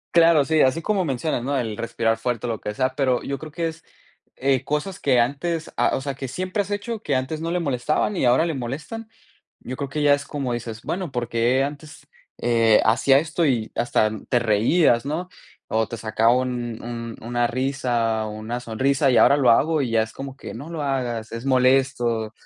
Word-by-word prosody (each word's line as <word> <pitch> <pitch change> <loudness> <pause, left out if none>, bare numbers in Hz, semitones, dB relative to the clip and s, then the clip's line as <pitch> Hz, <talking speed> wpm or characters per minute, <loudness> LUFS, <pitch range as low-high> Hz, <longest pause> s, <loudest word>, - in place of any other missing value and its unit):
Claro, 165 -4 +6
sí, 155 +1 +2
así 130 +5 +2
como 195 -2 +1
mencionas, 135 -2 -1
¿no? 140 +2 -1
El 115 -4 -2
respirar 115 0 -1
fuerte 120 0 -2
o - - -2
lo 110 - -5
que 105 - -4
sea, 130 +2 +1
pero 130 -3 +1
yo 140 0 -4
creo 155 -1 -9
que 165 +2 -2
es, 165 +1 -8 0.5
eh, 135 -1 +1
cosas 150 +5 -3
que 130 -3 +3
antes 155 +7 -1
ah, - - +2
o - - -3
sea, 140 0 -3
que 135 0 -6
siempre 185 - -2
has 200 - -6
hecho, 205 +2 -3
que 145 -9 -1
antes 130 +5 -2
no 165 - -2
le 180 - 0
molestaban 150 +6 0
y - - -1
ahora 125 +7 +4
le 165 - -1
molestan. 150 - -6 0.5
Yo 130 - -6
creo 140 0 -4
que 150 +2 -2
ya 145 -1 +6
es 145 0 -1
como 135 -5 -3
dices: 115 -1 -6
bueno, 180 -4 -3
¿por 120 -2 -3
qué 120 +3 +2
antes, 145 +1 -7 0.3
eh, 115 -2 +4
hacía 120 +5 +4
esto 160 +2 -2
y 115 -5 0
hasta 110 -2 +1 0.2
te 125 - +3
reías, 120 - +3
no? 165 +5 -3 0.4
O 110 0 0
te 115 - -6
sacaba 110 +1 +2
un 120 -3 -3
un 115 -1 -6
una 120 +1 0
risa 120 -4 -1
una 110 +3 -5
sonrisa 130 +4 +1
y 125 - +4
ahora 140 - +6
lo 130 -4 +4
hago 155 +6 +3
y 130 - -1
ya 110 -1 +3
es 110 - -9
como 135 0 -8
que: - - -8
"No 140 +7 -8
lo 165 -3 -4
hagas, 125 -5 -2
es 115 +2 -6
molesto". 125 -4 +2
130 Hz, 215 wpm, -23 LUFS, 120-150 Hz, 0.5 s, Claro